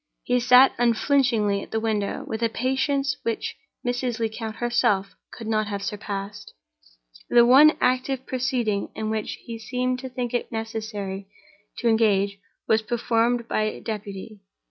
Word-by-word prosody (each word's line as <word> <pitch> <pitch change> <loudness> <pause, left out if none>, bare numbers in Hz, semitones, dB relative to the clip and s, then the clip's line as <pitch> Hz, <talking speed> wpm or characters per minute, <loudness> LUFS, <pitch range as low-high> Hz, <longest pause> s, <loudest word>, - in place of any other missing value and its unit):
He 250 0 +2
sat 250 +2 +6
unflinchingly 235 -4 +2
at - - -10
the 220 - -1
window 215 -3 -2
with 220 +1 -4
a 230 - +2
patience 265 +3 0
which 230 -1 -3 0.3
Mrs. 245 -1 -1
Lecount 220 0 -3
herself 210 -5 +1 0.2
could 230 - -9
not 215 -1 0
have 200 -1 -4
surpassed. 200 - -5 0.7
The 240 -1 +6
one 280 +5 +8
active 255 +1 0
proceeding 245 -5 -1
in 220 0 -3
which 220 -1 -2
he 230 -2 -6
seemed 250 +2 -2
to 260 0 -6
think 250 -1 -4
it 245 - -2
necessary 215 -3 -5 0.5
to 240 - -1
engage 200 -3 +2 0.3
was 220 0 +3
performed 235 +1 0
by 215 -2 -1
deputy. 210 -1 -6
225 Hz, 145 wpm, -24 LUFS, 215-250 Hz, 0.7 s, one